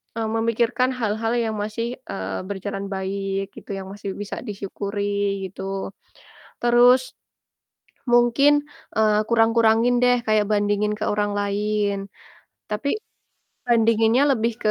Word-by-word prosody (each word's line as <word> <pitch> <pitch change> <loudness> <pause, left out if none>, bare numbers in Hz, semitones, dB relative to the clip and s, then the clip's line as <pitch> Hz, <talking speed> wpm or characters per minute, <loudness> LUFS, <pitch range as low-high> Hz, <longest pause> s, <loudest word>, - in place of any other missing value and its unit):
eee, 225 -1 -2
memikirkan 230 +3 +1
hal-hal 225 +1 -1
yang 220 -1 -2
masih, 215 +2 -3 0.2
eee, 95 -1 -4
berjalan 200 0 -4
baik 195 0 -3
gitu, - - -12
yang 190 -1 -7
masih 200 -1 -6
bisa 205 - -5
disyukuri 200 -1 -3
gitu. 195 +1 -5 0.7
Terus, 245 +2 +4 1.0
mungkin, 240 +4 +5 0.4
eee, 215 -1 +3
kurang-kurangin 230 +1 +4
deh 245 0 +4
kayak 215 -1 +3
bandingin 205 0 +1
ke 215 - -2
orang 205 0 0
lain. 205 0 0 0.7
Tapi 280 - -1 0.7
bandinginnya 230 +2 +4
lebih 230 -2 0
ke 215 - +3
215 Hz, 115 wpm, -23 LUFS, 200-230 Hz, 1.0 s, mungkin